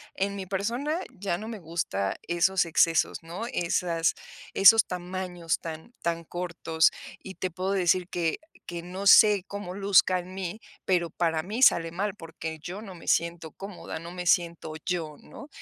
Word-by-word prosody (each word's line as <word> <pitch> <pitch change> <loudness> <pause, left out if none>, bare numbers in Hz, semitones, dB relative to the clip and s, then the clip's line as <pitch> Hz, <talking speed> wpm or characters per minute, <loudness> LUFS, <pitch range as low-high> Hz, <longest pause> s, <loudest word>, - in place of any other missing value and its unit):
en 200 +1 -1
mi 190 - -5
persona 235 - -1
ya 185 -2 -3
no 215 - -7
me 220 -3 -6
gusta 155 - -2
esos 175 +2 +2
excesos, 165 0 +3
¿no? 175 +7 -6
Esas 170 -4 0 0.4
esos 220 +3 +8
tamaños 180 -2 -3
tan 165 +8 -8
tan 170 0 -1
cortos, 170 -1 +1 0.3
y 190 - -9
te 185 -1 -3
puedo 185 +3 -2
decir 180 -1 +2
que 165 -2 -1 0.3
que 170 -1 -5
no 185 +3 -4
sé 205 -2 +7
cómo 200 -3 -6
luzca 195 -2 +4
en 180 +1 -9
mí, 190 +2 -5 0.2
pero 175 -3 +1
para 160 -1 0
mí 210 +9 -4
sale 165 -9 +5
mal, 200 +4 -2
porque 160 -2 -7
yo 185 +6 -6
no 195 -4 -9
me 165 - -13
siento 170 -2 0
cómoda. 195 -4 -8
No 170 +2 -8
me 180 0 -6
siento 170 -2 +1
yo, 165 -5 -2
¿no? 290 - -12
180 Hz, 170 wpm, -27 LUFS, 165-195 Hz, 0.4 s, esos